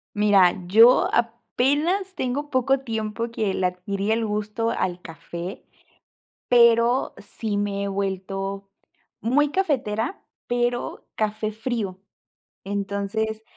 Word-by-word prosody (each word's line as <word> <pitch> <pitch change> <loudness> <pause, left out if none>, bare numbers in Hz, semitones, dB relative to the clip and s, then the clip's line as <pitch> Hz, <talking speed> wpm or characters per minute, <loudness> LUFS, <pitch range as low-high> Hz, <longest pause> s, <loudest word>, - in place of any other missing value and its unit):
Mira, 200 -4 +5
yo 225 +6 +6
apenas 290 - 0
tengo 280 +4 -2
poco 265 +1 +2
tiempo 225 -1 -3
que 215 -4 -1
le 185 - -1
adquirí 195 +3 -3
el 225 0 +1
gusto 210 +2 -2
al 180 -5 -2
café, 170 +2 -8 0.8
pero 235 +1 +4
sí 215 -3 -4
me 200 -1 -1
he - - -2
vuelto 195 0 -3 0.5
muy 285 +6 +3
cafetera, 270 - -1 0.2
pero 245 0 -1
café 215 0 -1
frío. 215 -5 -3 0.6
Entonces, 200 +2 -2
220 Hz, 105 wpm, -24 LUFS, 200-240 Hz, 0.8 s, yo